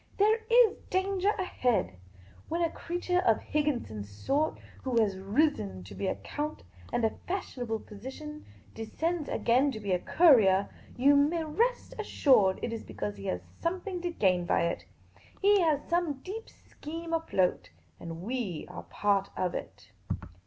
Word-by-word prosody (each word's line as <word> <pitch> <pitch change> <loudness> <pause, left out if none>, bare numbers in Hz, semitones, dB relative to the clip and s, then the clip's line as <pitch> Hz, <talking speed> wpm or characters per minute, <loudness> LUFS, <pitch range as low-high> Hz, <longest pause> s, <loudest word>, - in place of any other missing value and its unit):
There 430 +3 +4
is 470 -2 +6
danger 380 +1 +1
ahead. 250 - 0 0.6
When 335 +2 0
a 330 - +1
creature 355 +1 -1
of 370 - +3
Higginson's 240 - -1
sort, 275 - 0 0.2
who 250 -3 +1
has 200 -4 +1
risen 195 - 0
to 95 - -11
be 195 - -3
a - - 0
count 300 +1 -5 0.3
and 235 - +1
a 220 - +2 0.2
fashionable 250 - -3
physician, 265 +8 -8 0.3
descends 315 +8 -2
again 260 +4 +3
to 220 - -5
be 200 -2 -3
a 180 - +3
courier, 210 - +5 0.3
you 280 +3 +5
may, 305 +4 +3
rest 455 +11 0
assured 255 - +4
it 235 - -2
is 225 - -5
because 105 -1 -5
he 100 - -9
has 90 - -1 0.2
somethintr 360 +1 -2
to 350 - -1
gain 185 - +1
by - - +3
it. 170 - -2 0.5
He 405 0 +5
has 310 -4 +2
some 345 -3 +1
deep 440 +4 -6
scheme 330 +2 -8
afloat. 185 - +1 0.3
And 170 - -7
7f 170 +5 -8
v 230 -10 -3
are - - -7
part 200 -1 +1
of 180 -1 0
it." 105 +2 -7
275 Hz, 160 wpm, -30 LUFS, -, 0.6 s, is